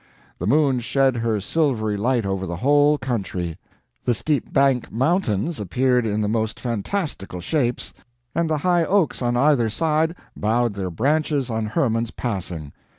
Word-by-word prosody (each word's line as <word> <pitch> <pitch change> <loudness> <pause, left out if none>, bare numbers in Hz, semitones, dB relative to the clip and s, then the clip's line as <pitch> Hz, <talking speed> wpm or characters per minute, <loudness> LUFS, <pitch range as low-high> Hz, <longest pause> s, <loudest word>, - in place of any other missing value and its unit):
The 90 - -2
moon 140 0 +3
shed 135 +1 +1
her 115 -2 0
silvery 110 - 0
light 120 +2 +1
over 95 -1 -2
the 85 - -3
whole 145 - +4
country; 95 - -3 0.4
the 120 - +1
steep 145 +5 -1
bank 135 -3 +2
mountains 135 - 0
appeared 125 +4 +1
in 105 0 0
the 105 - 0
most 110 0 -1
fantastical 120 - -3
shapes, 120 - -1 0.4
and 170 -1 0
the 155 - +1
high 175 -2 +4
oaks 185 -5 +1
on 120 0 +1
either 130 -4 +3
side 160 +6 +1 0.2
bowed 115 +1 +1
their 95 -2 -3
Branches 140 - 0
on 110 -1 -1
Hermann's 115 0 0
passing. 90 - -4
120 Hz, 150 wpm, -22 LUFS, 105-145 Hz, 0.4 s, whole